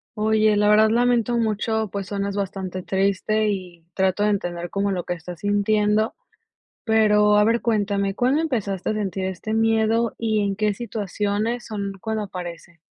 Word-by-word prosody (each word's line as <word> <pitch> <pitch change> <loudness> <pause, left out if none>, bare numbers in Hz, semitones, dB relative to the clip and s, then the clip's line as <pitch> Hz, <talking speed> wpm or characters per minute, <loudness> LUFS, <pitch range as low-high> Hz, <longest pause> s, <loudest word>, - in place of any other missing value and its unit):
Oye, 215 0 +3
la 210 0 +3
verdad 215 +1 +5
lamento 240 0 +2
mucho, 220 -1 0
pues, 200 -2 -4
suenas 200 0 -3
bastante 190 -2 -4
triste 200 +3 +1
y 180 -4 -5
trato 190 +1 +1
de 210 - +3
entender 175 -3 -2
como 200 0 -1
lo 180 -2 -2
que 180 - -3
estás 175 0 -9
sintiendo, 210 +1 +1 0.7
pero, 210 -2 +4
a 210 - +5
ver, 230 +2 +2
cuéntame, 200 -3 0
¿cuándo 260 +7 +2
empezaste 210 - -2
a - - -1
sentir 195 -3 -2
este 190 +4 -4
miedo 225 +1 +2
y 220 -2 0
en 200 -1 -1
qué 210 -1 +1
situaciones 215 +1 -2
son 200 -2 -4
cuando 220 -1 -2
aparece? 175 -2 -8
210 Hz, 165 wpm, -23 LUFS, 195-220 Hz, 0.7 s, verdad